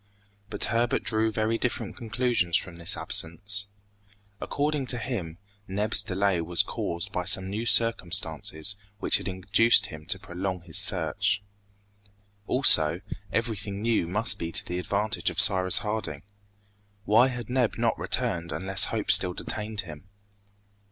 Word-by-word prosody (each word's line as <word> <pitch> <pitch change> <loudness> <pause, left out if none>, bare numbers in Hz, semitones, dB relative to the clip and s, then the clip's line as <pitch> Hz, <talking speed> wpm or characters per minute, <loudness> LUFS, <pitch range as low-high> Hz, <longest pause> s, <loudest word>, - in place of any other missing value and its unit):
But - - -2
Herbert 120 +1 -1
drew 110 0 0
very 110 +1 -2
different 120 -4 -4
conclusions 115 -6 -1
from 90 -2 -4
this 85 0 -4
absence. 100 +5 0 0.7
According 145 -2 -3
to 125 - +2
him, 105 -10 -6 0.3
Neb's 105 +3 +1
delay 95 -1 -1
was 85 +1 0
caused 85 0 -5
by 90 - -3
some 95 +2 +2
new 110 +3 -4
circumstances 100 -5 +1 0.2
which - - +2
had - - -8
induced 100 +4 +2
him 80 -6 -11
to - - +3
prolong 90 +1 -6
his 85 -3 +1
search. 100 0 +2 1.0
Also, 85 - +5 0.3
everything 105 -3 -4
new 115 -7 0
must 105 +6 +2
be 85 0 -5
to - - +1
the 90 0 -5
advantage 105 +4 -2
of - - -5
Cyrus 95 -3 +7
Harding. 105 -9 -4 0.8
Why 115 +5 +4
had 120 -4 -7
Neb 125 -2 -1
not - - 0
returned 85 -1 -3
unless 95 +4 +2
hope 110 -2 -2
still 90 -2 +5
detained 105 -1 -5
him? 80 -1 -12
100 Hz, 140 wpm, -25 LUFS, 90-115 Hz, 1.0 s, Cyrus